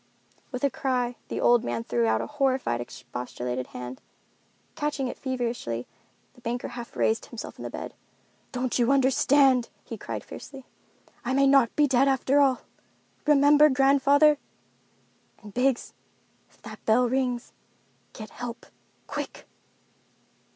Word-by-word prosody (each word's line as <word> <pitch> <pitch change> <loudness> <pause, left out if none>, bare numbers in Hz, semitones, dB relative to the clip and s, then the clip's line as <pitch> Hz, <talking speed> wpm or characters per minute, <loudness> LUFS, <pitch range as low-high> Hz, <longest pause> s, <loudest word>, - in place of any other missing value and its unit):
With 250 -1 -5
a 280 - +3
cry, 250 -2 -1
the - - -4
old 240 -1 +4
man 120 -1 -2
threw 115 -1 0
out 110 0 +2
a - - -3
horrified, 265 - 0
expostulating 125 +1 -5
hand. 125 +1 -8 0.7
Catching 295 -3 -2
it - - -5
feverishly, 235 - -3 0.5
the 250 - -20
banker 240 0 -3
half 240 -1 -8
raised 220 +1 +1
himself 235 - -8
in - - -5
bed. - - -7 0.6
"Don't 250 -1 -1
you 240 +2 +3
understand?" 270 -1 +4
he - - -8
cried - - -5
fiercely. 270 -2 -10 0.6
"I 260 +1 -1
may 275 +1 +4
not 270 -4 +4
be 300 - +4
dead 270 0 +3
after 270 +1 +2
all. 265 -3 +3 0.7
Remember 295 +1 +6
grandfather! 280 +2 +4 1.0
And 210 -1 -11
Biggs—if 255 0 -4
that - - -10
bell 240 +3 +4
rings, 250 -1 -1 0.6
get 215 -2 -9
help—quick!" 240 -1 -8
250 Hz, 130 wpm, -26 LUFS, 230-275 Hz, 1.0 s, Remember